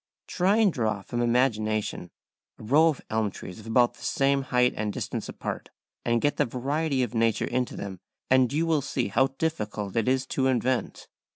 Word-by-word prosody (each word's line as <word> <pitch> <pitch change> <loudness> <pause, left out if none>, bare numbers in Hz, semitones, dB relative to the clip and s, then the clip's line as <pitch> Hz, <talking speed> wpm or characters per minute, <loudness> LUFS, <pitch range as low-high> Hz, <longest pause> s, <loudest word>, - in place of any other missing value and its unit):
Try 190 +4 +2
and 210 -6 +4
draw 110 -4 -1
from 120 +3 -3
imagination 110 -6 0 0.5
a - - -12
row 145 +9 +5
of 155 -4 0
elm 110 -1 +1
trees 90 -1 -9
of 110 - -12
about 120 +1 +3
the - - -15
same 140 0 +2
height 125 -1 +2
and 105 0 -2
distance - - -4
apart, - - -5 0.3
and 120 0 +2
get 145 - +1
the 145 - +3
variety 135 +3 -1
of 120 - -4
nature 115 -2 +1
into 125 0 -2
them; 95 -2 -6 0.3
and 130 -1 +4
you 155 +3 +1
will 160 -3 +2
see 130 -4 -2
how 130 +6 +3
difficult 105 - -3
it 115 -1 +1
is 130 0 +2
to 135 0 0
invent. 130 0 -1
125 Hz, 190 wpm, -27 LUFS, 110-140 Hz, 0.5 s, row